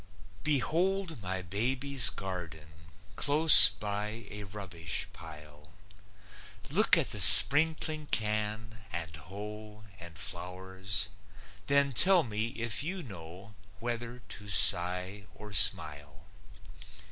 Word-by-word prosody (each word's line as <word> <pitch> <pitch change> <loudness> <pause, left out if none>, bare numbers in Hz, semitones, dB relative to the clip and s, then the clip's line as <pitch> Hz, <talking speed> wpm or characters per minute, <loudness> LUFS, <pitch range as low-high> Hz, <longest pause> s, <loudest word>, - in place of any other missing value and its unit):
Behold 160 - -4
my 95 0 -9
baby's 125 +6 -2
garden, 85 -5 -12 0.5
Close 145 -7 +6
by 105 +2 -9
a 105 0 -11
rubbish 90 -5 -7
pile! 75 -1 -18 1.0
Look - - 0
at - - -5
the 105 - -6
sprinkling 155 - +7
can 110 0 -6
and 80 -3 -10
hoe 105 +6 -14 0.2
And 85 -2 -15
flowers; 95 +4 -6 0.6
then 140 0 -1
tell 180 - +1
me 110 -2 -7
if 115 -1 -5
you 180 +4 -6
know 95 - -15 0.3
Whether 120 0 -10
to 105 0 -12
sigh 90 +2 +3
or 105 -1 -15
smile. 75 -4 -2
105 Hz, 100 wpm, -25 LUFS, 90-120 Hz, 1.0 s, sprinkling